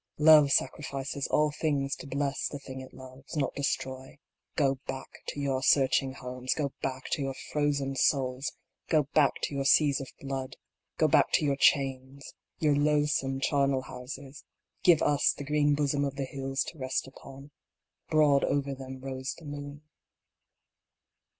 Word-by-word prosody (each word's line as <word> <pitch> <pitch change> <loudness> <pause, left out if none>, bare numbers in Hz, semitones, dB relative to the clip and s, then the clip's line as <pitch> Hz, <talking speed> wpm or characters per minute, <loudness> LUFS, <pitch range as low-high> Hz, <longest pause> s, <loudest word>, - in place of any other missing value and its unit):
Love 150 -1 +7
sacrifices 140 -2 -1
all 150 0 +2
things 145 -3 -1
to - - -10
bless 140 0 -1
the 145 - -6
thing 130 -1 -8
it 130 - -11
loves, 130 +4 -10
not 140 -3 0
destroy. 130 -1 -3 0.4
Go 135 -3 +1
back 135 0 -7
to - - -4
your 135 -2 -1
scorching 135 0 +3
homes; 125 0 -3
Go 140 -3 -2
back 130 -1 -3
to - - 0
your 135 -1 -2 0.2
frozen 140 -2 0
souls; 130 0 +1 0.4
Go 155 -2 +4
back 150 -3 +4
to - - -1
your 140 0 -1
seas 140 0 +4
of 135 - -7
blood; 135 -1 -5 0.4
Go - - +4
back - - +4
to - - +3
your 140 -1 +2
chains, 135 -1 +1 0.2
your 150 -2 +2
loathsome 145 -2 +1
charnel 140 -2 +1
houses; 135 +3 -9 0.4
Give 175 -4 +5
us 145 -1 +3
the 145 - -5
green 145 0 +2
bosom 145 -1 0
of 140 -1 -2
the 135 -1 -2
hills 135 0 -2
to 160 - -15
rest 130 0 -1
upon; 135 +1 -13 0.6
Broad 150 -3 +4
over 140 -1 0
them 130 -1 -8
rose 130 0 -4
the 165 - -13
moon. 145 0 -7
140 Hz, 160 wpm, -29 LUFS, 135-145 Hz, 0.6 s, Love